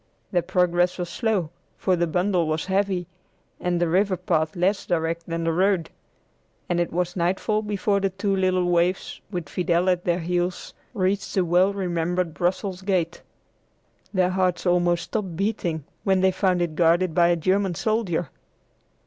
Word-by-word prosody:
Their 175 Hz, -, +2 dB
progress 175 Hz, 0 st, +1 dB
was 175 Hz, -2 st, -4 dB
slow, 200 Hz, -6 st, -1 dB, 0.3 s
for 185 Hz, -, +1 dB
the 170 Hz, 0 st, 0 dB
bundle 180 Hz, 0 st, +1 dB
was 155 Hz, 0 st, -1 dB
heavy, 190 Hz, -1 st, 0 dB, 0.5 s
and 175 Hz, -1 st, 0 dB
the 175 Hz, -, +2 dB
river 185 Hz, +3 st, +2 dB
path 160 Hz, -2 st, 0 dB
less 190 Hz, +3 st, 0 dB
direct 165 Hz, 0 st, -1 dB
than 165 Hz, 0 st, -2 dB
the 165 Hz, 0 st, +1 dB
road, 185 Hz, -1 st, +1 dB, 0.8 s
and 175 Hz, -, 0 dB
it 175 Hz, -, 0 dB
was 175 Hz, +1 st, -1 dB
nightfall 190 Hz, +5 st, 0 dB
before 205 Hz, -1 st, 0 dB
the 195 Hz, 0 st, +1 dB
two 195 Hz, +1 st, -1 dB
little 185 Hz, -1 st, +1 dB
waifs, 175 Hz, +1 st, 0 dB
with 175 Hz, -6 st, -4 dB
Fidel 175 Hz, +2 st, +1 dB
at 180 Hz, -1 st, -1 dB
their 175 Hz, -1 st, +1 dB
heels, 175 Hz, +1 st, -2 dB, 0.2 s
reached 195 Hz, 0 st, -1 dB
the 190 Hz, -2 st, +2 dB
well 180 Hz, +3 st, +3 dB
remembered 175 Hz, -3 st, -1 dB
Brussels 185 Hz, +2 st, -1 dB
gate. 180 Hz, -4 st, -1 dB, 0.9 s
Their 185 Hz, -2 st, +2 dB
hearts 185 Hz, -1 st, 0 dB
almost 175 Hz, -1 st, +2 dB
stopped 195 Hz, -6 st, -4 dB
beating 175 Hz, -5 st, -1 dB, 0.2 s
when 190 Hz, -1 st, +2 dB
they 190 Hz, 0 st, +4 dB
found 185 Hz, -1 st, +1 dB
it 170 Hz, -2 st, -3 dB
guarded 170 Hz, +2 st, +3 dB
by 170 Hz, +1 st, +4 dB
a 175 Hz, -, +3 dB
German 185 Hz, +2 st, +1 dB
soldier. 190 Hz, -7 st, -1 dB
180 Hz, 165 wpm, -24 LUFS, 170-190 Hz, 0.9 s, they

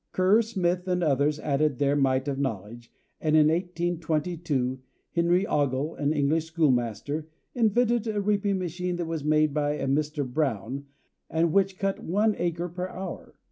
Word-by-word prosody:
] -, -, -55 dB
Kerr, 190 Hz, +5 st, +4 dB
Smith 185 Hz, -5 st, -1 dB
and 180 Hz, -1 st, +1 dB
others 145 Hz, 0 st, +2 dB
added 145 Hz, -1 st, +1 dB
their 140 Hz, +1 st, +2 dB
mite 135 Hz, -1 st, +1 dB
of 140 Hz, -1 st, -2 dB
knowledge, 115 Hz, -2 st, -4 dB, 0.3 s
and 155 Hz, -1 st, +1 dB
in 155 Hz, -1 st, +6 dB
1822 165 Hz, -5 st, -1 dB, 0.3 s
Henry 175 Hz, +3 st, +2 dB
Ogle, 145 Hz, -1 st, 0 dB
an 145 Hz, 0 st, -1 dB
English 155 Hz, +2 st, +1 dB
schoolmaster, 145 Hz, -, 0 dB, 0.3 s
invented 235 Hz, 0 st, +2 dB
a 215 Hz, -1 st, -1 dB
reaping 200 Hz, -1 st, +1 dB
machine 180 Hz, 0 st, -3 dB
that 175 Hz, -1 st, -3 dB
was 160 Hz, -2 st, -3 dB
made 155 Hz, -1 st, +3 dB
by 145 Hz, -1 st, +1 dB
a 150 Hz, -, -3 dB
Mr. 145 Hz, +1 st, 0 dB
Brown, 135 Hz, -1 st, -2 dB, 0.4 s
and 165 Hz, 0 st, +1 dB
which 195 Hz, -1 st, +2 dB
cut 195 Hz, 0 st, -1 dB
one 210 Hz, +5 st, +2 dB
acre 170 Hz, 0 st, -1 dB
per 180 Hz, +2 st, -4 dB
hour. 185 Hz, -1 st, -7 dB
160 Hz, 160 wpm, -27 LUFS, 140-180 Hz, 0.4 s, in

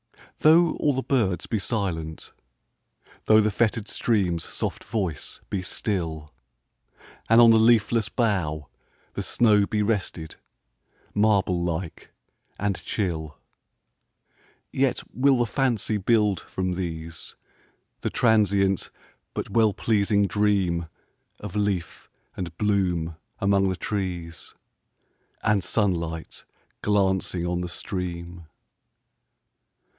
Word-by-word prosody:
Though 160 Hz, +2 st, +6 dB
all 145 Hz, -, +2 dB
the 130 Hz, -, -1 dB
birds 105 Hz, -10 st, 0 dB
be 110 Hz, -, -1 dB
silent,—thoughThe 95 Hz, -, -2 dB
fettered 110 Hz, 0 st, 0 dB
stream's 95 Hz, -10 st, 0 dB
soft -, -, -4 dB
voice 95 Hz, -10 st, -3 dB
be 95 Hz, -, -1 dB
still, 85 Hz, -, -3 dB, 1.0 s
And 115 Hz, +1 st, +7 dB
on 115 Hz, -1 st, +8 dB
the 110 Hz, -, +6 dB
leafless 115 Hz, -1 st, +3 dB
bough 90 Hz, -, -1 dB, 0.5 s
the -, -, -3 dB
snowBe 105 Hz, -2 st, +2 dB
rested, 95 Hz, -7 st, -3 dB, 0.8 s
marble 100 Hz, -4 st, +2 dB
like 85 Hz, 0 st, -4 dB, 0.5 s
and 100 Hz, -2 st, -2 dB
chill,—Yet 80 Hz, -7 st, -5 dB
will 135 Hz, +3 st, +3 dB
the 120 Hz, -, +2 dB
fancy 115 Hz, -3 st, 0 dB
build, 105 Hz, -1 st, +2 dB
from 95 Hz, -1 st, -3 dB
these, 85 Hz, -2 st, -6 dB, 0.6 s
The -, -, -2 dB
transient 100 Hz, -4 st, +2 dB, 0.5 s
but -, -, -4 dB
well 110 Hz, -3 st, +3 dB
pleasing 100 Hz, -2 st, +2 dB
dreamOf 95 Hz, -5 st, +1 dB, 0.6 s
leaf 100 Hz, -6 st, -2 dB, 0.3 s
and 85 Hz, -2 st, -6 dB
bloom 90 Hz, -6 st, 0 dB, 0.2 s
among 100 Hz, -2 st, +2 dB
the 95 Hz, -, -1 dB
trees, 90 Hz, -4 st, -4 dB, 0.9 s
And 105 Hz, -4 st, +2 dB
sunlight 85 Hz, -7 st, -2 dB, 0.4 s
glancing 95 Hz, -3 st, +1 dB
on 90 Hz, 0 st, -1 dB
the 90 Hz, -, -4 dB
stream. 85 Hz, -2 st, -5 dB
100 Hz, 95 wpm, -25 LUFS, 85-110 Hz, 1.0 s, on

